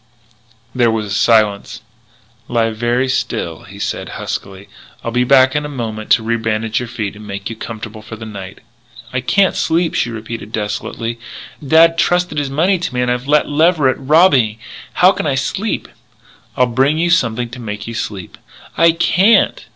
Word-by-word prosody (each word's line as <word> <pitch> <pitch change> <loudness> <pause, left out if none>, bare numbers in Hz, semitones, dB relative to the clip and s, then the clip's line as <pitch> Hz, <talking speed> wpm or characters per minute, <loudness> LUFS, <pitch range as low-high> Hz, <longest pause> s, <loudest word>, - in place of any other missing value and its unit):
There 120 -2 +3
was 110 -1 -1
a - - -8
silence. 105 -1 +2 0.7
"Lie 115 -2 +1
very 120 +3 0
still," 115 -5 -3
he 100 -2 -12
said 100 - -4
huskily. 95 +1 -6 0.4
"I'll 115 - -3
be 125 +1 +2
back 130 +1 +4
in 150 - 0
a 150 - -5
moment 110 -6 -5
to 115 - +2
rebandage 110 -1 -1
your 125 - -5
feet 110 -4 -4
and 105 0 -11
make 100 +1 -5
you - - -6
comfortable 110 -1 -8
for 110 +1 -9
the 110 0 -9
night." 100 -3 -9 0.5
"I 130 - -1
can't 195 +9 +2
sleep," 165 0 0
she - - 0
repeated 110 -1 -7
desolately. 110 +2 -4 0.4
"Dad 165 +3 +5
trusted 175 -3 +1
his 145 -2 -2
money 175 +7 +1
to 165 -7 -4
me 125 - +1
and 125 - 0
I've 125 +2 -3
let 150 +1 +3
Leverett 155 -2 +2
rob 160 +7 +5
me. 110 -5 +2 0.4
How 180 +1 +5
can 180 - -3
I 140 - +1
sleep?" 190 +11 -2 0.7
"I'll 125 - +5
bring 135 +5 +1
you 170 +1 +1
something 120 -7 +1
to 125 +1 -9
make 105 -2 -6
you 115 - -6
sleep." 100 -5 -6 0.4
"I 165 0 +5
can't!" 185 +6 +3
120 Hz, 180 wpm, -17 LUFS, 110-150 Hz, 0.7 s, Dad